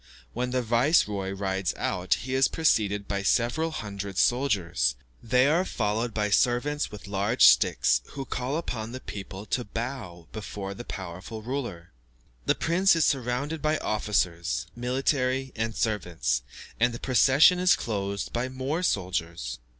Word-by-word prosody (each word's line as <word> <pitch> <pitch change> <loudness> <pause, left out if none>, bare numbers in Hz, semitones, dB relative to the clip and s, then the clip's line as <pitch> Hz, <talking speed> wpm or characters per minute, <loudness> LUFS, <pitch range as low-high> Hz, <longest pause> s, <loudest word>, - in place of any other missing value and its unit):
When 125 +1 -2
the 125 0 0
viceroy 115 - +2
rides 95 -2 -2
out, 90 +1 0
he 130 +2 -5
is 130 0 +4
preceded 105 -10 +1
by 100 -1 -1
several 120 +10 +1
hundred 100 - -6
soldiers. 95 - +2 0.3
They 125 +3 +3
are 160 +6 +3
followed 115 - -1
by 105 -1 -1
servants 125 +7 +2
with 105 -4 -10
large 100 0 +3
sticks, - - +5
who 135 -1 -6
call 130 +3 -2
upon 115 -8 -4
the 130 - -5
people 100 -3 -8
to 125 - -1
bow 115 -7 -6
before 100 -2 -6
the 110 - -8
powerful 95 +3 -7
ruler. 115 -10 -5 0.6
The - - +4
prince 180 +3 +3
is 165 - +3
surrounded 135 +4 -1
by 155 0 +1
officers, 85 - -1
military, 130 +1 0
and 115 0 -2
servants, 85 - -1 0.4
and 120 0 +2
the - - -7
procession 135 - +5
is 180 0 +5
closed 100 -2 -3
by 120 +2 -1
more 130 +6 -2
soldiers. 85 - -2
115 Hz, 145 wpm, -27 LUFS, 95-130 Hz, 0.6 s, sticks